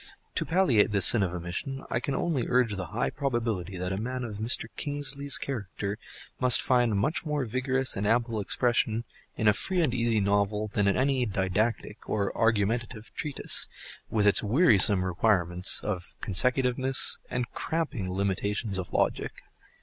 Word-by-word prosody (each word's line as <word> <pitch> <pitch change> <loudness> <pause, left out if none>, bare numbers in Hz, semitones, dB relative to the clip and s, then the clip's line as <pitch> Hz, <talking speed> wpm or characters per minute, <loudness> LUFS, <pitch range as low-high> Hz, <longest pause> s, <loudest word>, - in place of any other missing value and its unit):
To - - -2
palliate 165 - +3
this 100 -3 +3
sin 115 - +5
of 95 -3 0
omission 90 +10 -5
I - - +1
can 135 +2 -3
only 150 -8 -1
urge 125 -4 +1
the 95 -2 -5
high 110 +7 -2
probability 115 - -3
that 90 +1 -3
a - - -3
man 125 +2 -4
of 110 -4 -6
Mr. 110 +2 +1
Kingsley's 145 -1 -2
character 105 -5 -5 0.4
must 125 -2 +7
find 120 -5 +2
much 150 +12 0
more 150 -4 -2
vigorous 130 +3 0
and 100 +1 -2
ample 115 0 +1
expression 115 +1 0 0.3
in 110 - 0
a 105 - +6
free 180 - 0
and 155 -8 +1
easy 115 -2 +1
novel 100 +1 0
than 100 0 0
in 100 - +2
any 130 0 +1
didactic 105 +3 -2
or 100 -2 -1
argumentative 115 0 -1
treatise, 150 -2 -1 0.4
with 105 -2 0
its 105 - +4
wearisome 105 - +4
requirements 90 -1 +2
of 95 -4 -4
consecutiveness 125 +5 +2
and 125 -1 -3
cramping 145 - -3
limitations 100 +2 -2
of 90 - -6
logic. - - -1
115 Hz, 155 wpm, -27 LUFS, 100-130 Hz, 0.4 s, must